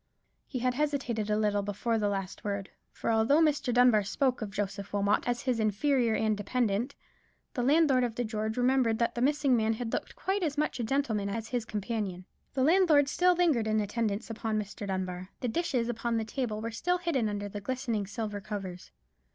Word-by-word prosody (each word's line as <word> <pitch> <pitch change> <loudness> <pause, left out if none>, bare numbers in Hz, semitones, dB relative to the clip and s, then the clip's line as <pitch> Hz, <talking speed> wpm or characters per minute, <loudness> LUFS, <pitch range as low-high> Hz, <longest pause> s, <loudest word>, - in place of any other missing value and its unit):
He - - -4
had 250 0 +1
hesitated 255 -6 -1
a 210 - +2
little 210 -1 +1
before 205 +3 -1
the 205 -1 +1
last 195 -2 -4
word; 200 -1 -3 0.2
for - - -2
although 225 +7 +4
Mr. 300 -5 +2
Dunbar 245 -3 +5
spoke 250 +6 0
of 215 - -3
Joseph 200 -1 -4
Wilmot 205 +2 +1
as 245 0 -1
his 255 -3 0
inferior 225 +2 +2
and 215 -1 +1
dependant, 225 +3 -1 0.6
the 250 - -1
landlord 275 -1 +4
of 235 -2 -1
the 245 - -1
George 220 0 -3
remembered 250 -2 +3
that 235 0 +1
the 240 - -3
missing 280 -1 +3
man 225 -1 +2
had 225 0 -4
looked - - -3
quite 390 +1 -1
as 305 -4 -1
much 300 -3 0
a - - 0
gentleman 220 -5 0
as 225 +2 -4
his 245 -3 -1
companion. 210 -4 -3 0.3
The 260 - +2
landlord 310 -3 +5
still 360 +4 +3
lingered 310 -11 +2
in 215 0 +2
attendance 215 +1 -2
upon 220 -1 -2
Mr. 205 0 -6
Dunbar. 185 -1 -3
The 250 - -2
dishes 245 -3 0
upon 235 0 -1
the 220 - -1
table 220 -2 -3
were 230 +1 -3
still 355 +10 0
hidden 325 -11 0
under 205 0 -3
the 205 0 -6
glistening 230 -3 -2
silver 210 0 -4
covers. 190 -4 -6
225 Hz, 200 wpm, -30 LUFS, 210-260 Hz, 0.6 s, Dunbar